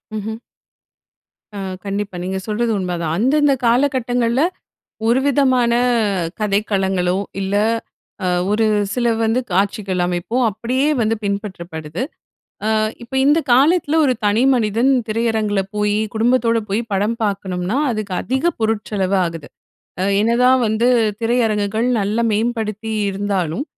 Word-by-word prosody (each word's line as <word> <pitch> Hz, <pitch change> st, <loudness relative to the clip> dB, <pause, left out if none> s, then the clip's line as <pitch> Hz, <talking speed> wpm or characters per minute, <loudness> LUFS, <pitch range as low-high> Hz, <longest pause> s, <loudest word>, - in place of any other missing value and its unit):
ம்ஹ்ம். 215 Hz, +1 st, -4 dB, 1.2 s
அ -, -, -5 dB, 0.3 s
கண்டிப்பா. 200 Hz, -1 st, -3 dB
நீங்க 190 Hz, +1 st, -3 dB
சொல்றது 225 Hz, +2 st, 0 dB
உண்மைதான். 175 Hz, -4 st, -2 dB
அந்தந்த 280 Hz, +6 st, +3 dB
காலகட்டங்கள்ல 245 Hz, -1 st, +1 dB, 0.7 s
ஒரு 235 Hz, +3 st, +3 dB
விதமான 260 Hz, -3 st, +3 dB, 0.7 s
கதைக்களங்களோ, 195 Hz, -3 st, 0 dB, 0.2 s
இல்ல 195 Hz, +1 st, -2 dB, 0.7 s
அ -, -, +1 dB, 0.2 s
ஒரு 220 Hz, +2 st, +2 dB, 0.3 s
சில 245 Hz, -1 st, 0 dB, 0.2 s
வந்து 225 Hz, +3 st, +2 dB
காட்சிகள் 195 Hz, 0 st, 0 dB
அமைப்போ 175 Hz, +7 st, -3 dB
அப்படியே 245 Hz, +7 st, -1 dB
வந்து 225 Hz, 0 st, +2 dB
பின்பற்றப்படுது. 180 Hz, -5 st, -4 dB, 0.6 s
அ -, -, +2 dB, 0.3 s
இப்ப 235 Hz, +2 st, -10 dB
இந்த 295 Hz, +3 st, +5 dB
காலத்தில 300 Hz, +4 st, +3 dB
ஒரு 260 Hz, -, +3 dB
தனி 210 Hz, +3 st, +2 dB
மனிதன் 230 Hz, +3 st, +2 dB, 0.2 s
திரையரங்கில 220 Hz, -2 st, 0 dB, 0.2 s
போயி, 210 Hz, 0 st, +1 dB, 0.2 s
குடும்பத்தோட 230 Hz, +1 st, +2 dB
போயி 210 Hz, +4 st, 0 dB
படம் 205 Hz, +4 st, 0 dB
பாக்கணும்னா, 190 Hz, 0 st, -2 dB
அதுக்கு 215 Hz, -4 st, -4 dB
அதிக 265 Hz, +7 st, 0 dB
பொருட்செலவு 210 Hz, -3 st, 0 dB
ஆகுது. 165 Hz, -3 st, -6 dB, 0.5 s
அ -, -, +1 dB, 0.2 s
என்னதான் 250 Hz, +4 st, +3 dB
வந்து 220 Hz, +3 st, +1 dB, 0.3 s
திரையரங்குகள் 225 Hz, -1 st, +1 dB
நல்லா 215 Hz, +4 st, 0 dB
மேம்படுத்தி 220 Hz, -1 st, -2 dB, 0.2 s
இருந்தாலும், 195 Hz, -, -2 dB
215 Hz, 115 wpm, -19 LUFS, 195-240 Hz, 1.2 s, இந்த